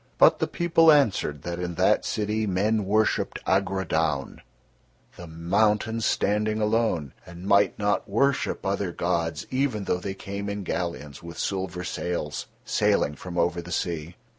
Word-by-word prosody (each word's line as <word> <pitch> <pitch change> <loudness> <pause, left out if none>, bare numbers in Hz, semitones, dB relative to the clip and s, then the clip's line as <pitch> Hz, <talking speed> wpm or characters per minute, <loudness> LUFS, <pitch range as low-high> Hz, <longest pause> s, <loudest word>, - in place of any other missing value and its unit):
But - - +6
the - - +1
people 165 -2 +4
answered 105 - +2
that 85 0 -4
in 90 -1 -3
that - - +3
city 105 0 -1
men 105 +3 +1
worshipped 105 +2 +1
Agrodaun, 80 -7 0 0.7
the 85 - -10
mountain 105 +7 +1
standing 105 0 +1
alone, 105 - 0
and 85 +2 -11
might 100 +1 +3
not 105 -1 0
worship 135 +7 +1
other 95 -1 -1
gods 85 -2 -1
even 130 -5 0
though 90 - 0
they 95 +1 -5
came 100 +1 -5
in 100 0 -4
galleons 85 -6 -4
with 85 -1 -9
silver 95 -2 -3
sails, 85 -4 -3 0.2
sailing 75 - +2
from 90 +3 -8
over 85 0 +1
the 90 +1 -10
sea. 85 -1 -3
95 Hz, 145 wpm, -26 LUFS, 85-105 Hz, 0.7 s, But